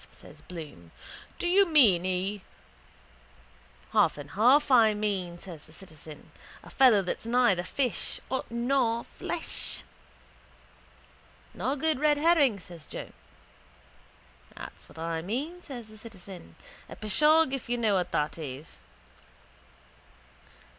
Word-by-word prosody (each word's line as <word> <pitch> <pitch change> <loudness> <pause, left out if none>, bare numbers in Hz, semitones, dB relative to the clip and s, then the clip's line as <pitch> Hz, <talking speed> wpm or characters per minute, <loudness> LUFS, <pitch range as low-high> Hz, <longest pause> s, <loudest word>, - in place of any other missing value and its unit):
says - - -14
Bloom. 150 - -10 0.5
Do 350 - -2
you 390 +2 +5
mean 215 - +5
he... 185 +2 -1 1.5
—Half - - +4
and 145 -1 -9
half 255 +8 +4
I 225 -4 +6
mean, 195 -5 -2
says 170 -4 -10
the 155 - -17
citizen. 155 -4 -12 0.3
A - - -13
fellow 245 -7 +5
that's 180 - -4
neither 235 -7 +3
fish 245 +6 -2 0.3
nor 235 -1 +1
flesh. - - -5 1.7
—Nor 255 +10 -1
good 310 -1 0
red 300 0 +3
herring, 290 -9 +4
says 170 -4 -12
Joe. - - -7 1.4
—That - - -8
what's - - -17
I 165 0 -3
mean, 280 - -4
says 245 -8 -8
the 215 0 -14
citizen. 190 - -11 0.3
A - - -8
pishogue, 300 +7 +3
if 270 -3 -4
you 245 - 0
know 220 -3 +2
what 180 -2 0
that 150 +2 -1
is. 145 0 -8
215 Hz, 120 wpm, -28 LUFS, 175-265 Hz, 1.7 s, I